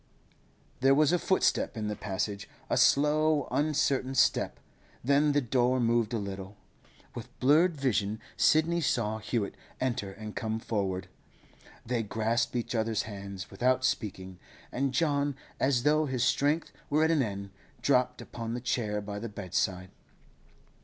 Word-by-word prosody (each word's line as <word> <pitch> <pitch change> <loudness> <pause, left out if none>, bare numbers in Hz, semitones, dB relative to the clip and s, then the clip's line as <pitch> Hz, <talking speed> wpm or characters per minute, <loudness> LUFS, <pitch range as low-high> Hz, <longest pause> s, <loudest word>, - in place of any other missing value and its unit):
There 135 +1 +5
was 155 +3 +4
a 175 - +3
footstep 190 -8 +1
in 105 -1 -2
the 105 - -2
passage, 100 0 -3 0.2
a - - +3
slow, 150 +1 +3
uncertain 140 -3 +1
step; - - +2 0.4
then 145 +3 +3
the 145 - +3
door 125 +1 +2
moved 115 -2 +2
a 120 - 0
little. 100 -1 -6 0.6
With - - -10
blurred 155 +5 +4
vision 110 -5 0 0.2
Sidney 165 +2 +3
saw 110 -6 0
Hewett 110 -1 -2 0.3
enter 120 -6 -2
and 105 +2 -8
come 110 0 -2
forward. 95 -5 -2 0.8
They 120 0 0
grasped 115 +3 -1
each 120 0 -2
other's 110 -1 0
hands 100 -2 -7
without 130 +5 +1
speaking, 95 -7 -3 0.3
and 135 +1 0
John, 145 -1 +1 0.2
as 130 -3 +2
though 155 +1 +3
his 130 -2 -1
strength 145 +5 +1 0.2
were 155 +1 +3
at 160 - +3
an 155 -3 +3
end, 100 -4 -4 0.3
dropped 125 -2 +2
upon 115 -1 -5
the - - -3
chair 110 -4 -1
by 100 0 -5
the 115 +2 -5
bedside. 95 -2 -2
120 Hz, 145 wpm, -29 LUFS, 105-140 Hz, 0.8 s, There